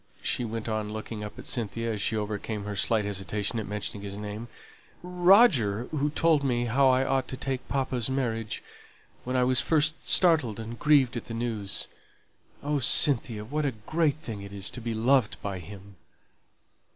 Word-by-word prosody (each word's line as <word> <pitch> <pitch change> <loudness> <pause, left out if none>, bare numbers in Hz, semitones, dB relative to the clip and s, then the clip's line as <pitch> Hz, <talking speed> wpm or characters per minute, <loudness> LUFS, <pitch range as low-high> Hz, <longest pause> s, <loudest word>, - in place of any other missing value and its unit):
she - - 0
went 115 -1 -4
on 110 -1 -2
looking 110 0 -6
up 105 - -8
at - - -9
Cynthia, 115 0 -2
as 105 - -4
she 110 - 0
overcame 105 0 -3
her 105 0 -4
slight 105 +2 +1
hesitation 105 +3 -2
at 110 - -5
mentioning 105 0 -5
his 100 0 -6
name 105 +2 -6 0.6
"Roger, 180 - +4
who 150 -1 0
told 155 -1 +2
me 120 -3 +1
how 135 +4 +3
I 130 +1 +3
ought 135 0 0
to 130 - -6
take 130 -1 -3
papa's 130 -3 0
marriage, 115 -5 -2 0.6
when 125 +1 -2
I 125 - +3
was 130 0 +3
first 155 0 0
startled 155 - +3
and 115 +1 -7
grieved 140 -5 +4
at 120 - -6
the 115 - -6
news. 115 -4 -2 0.8
Oh, 145 0 0
Cynthia, 120 -5 +3
what 150 +6 -2
a 140 -3 0
great 155 -3 +1
thing 115 -9 -7
it 100 0 -9
is 100 0 -2
to 125 - -7
be 115 -1 -3
loved 120 0 +2
by 100 -2 -3
him!" 100 +1 -12
115 Hz, 180 wpm, -27 LUFS, 105-135 Hz, 0.8 s, Roger